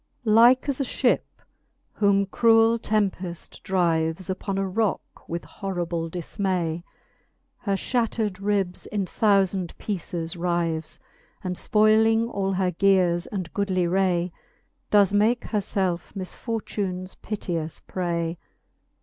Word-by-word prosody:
L. 215 - +3
Like 240 +5 +6
as 280 -1 -1
a - - +2
Ihip, 255 - +2 0.7
whom 200 -1 +3
cruel 225 +2 +4
tempeft 190 -6 -2
drives 170 -1 0
Upon 195 +1 -3
a 195 0 0
rock 210 +1 -2
with 170 +1 -4
horrible 175 -4 -3
diimay, 175 -1 -2 0.8
He 200 - 0
fhattered 220 -2 -1
ribs 195 -3 -1
in 205 -2 -1
thoufand 195 -3 +1
peeces 175 -4 -4
rives, 170 -2 -1 0.4
And 180 -1 -2
fpoyling 220 +3 +3
all 195 -1 0
her 185 -1 +1
geares 180 -2 +2
and 185 -5 -4
goodly 190 -3 0
ray, 180 -1 +1 0.6
Does 200 -2 +5
makes 220 +4 +2
her 215 - +1
lelfe 190 -2 -2
misfortunes 190 -2 -4
piteous 170 -7 -4
pray. 170 -2 -3
190 Hz, 115 wpm, -25 LUFS, 175-210 Hz, 0.8 s, Like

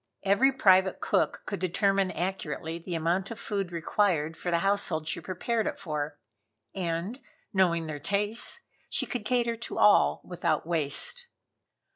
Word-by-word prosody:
Every 200 +8 +4
private 190 -7 +4
cook - - 0
could 200 - -4
determine 195 +1 +1
accurately 170 -2 -3
the 170 +1 -5
amount 170 +4 0
of 230 -1 -7
food 195 -4 -3
required 165 -2 0
for 175 - -4
the 170 - +2
household 180 -6 +1
she - - -2
prepared 220 +5 -2
it - - -3
for, 150 -4 -4 0.6
and 180 +6 -3 0.3
knowing 170 -4 +2
their 155 -2 -5
tastes 205 +6 0 0.3
she - - 0
could 245 -5 -5
cater 235 -1 +1
to 235 - -6
all 210 - +5
without 175 -2 -1
waste. 170 - +1
190 Hz, 145 wpm, -28 LUFS, 165-205 Hz, 0.6 s, all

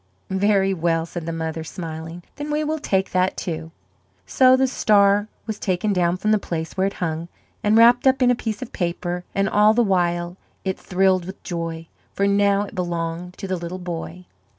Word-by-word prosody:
"Very 195 0 +2
well," 165 -2 0
said 170 -1 -7
the - - -1
mother, 160 0 -4
smiling; 165 +1 -7
"then 290 +1 -5
we 300 +1 0
will 310 +1 -2
take 190 -9 0
that, 185 0 +1
too." 160 -2 -4 0.6
So 255 -1 +5
the 265 - +3
star 205 -4 +3 0.2
was 220 -2 -5
taken 200 +2 0
down 175 -1 +1
from 215 +3 0
the 215 - +4
place 160 -4 -4
where 190 0 +1
it 195 - -4
hung 165 -1 -3 0.4
and 210 +1 +4
wrapped 240 +3 +6
up 265 0 +4
in 250 - +5
a - - +3
piece 220 -1 -4
of 245 - -11
paper, 175 0 -3
and 195 0 +2
all 210 +2 +4
the 240 - +4
while 175 -3 0 0.3
it 190 0 -2
thrilled 185 -1 +1
with 190 +2 -9
joy, 165 -2 -4 0.3
for 200 - +1
now 200 0 +3
it 205 - -9
belonged 175 -1 -3
to 195 - -6
the 185 -1 -1
little 170 +1 -5
boy. 175 0 -6
185 Hz, 195 wpm, -22 LUFS, 170-205 Hz, 0.6 s, wrapped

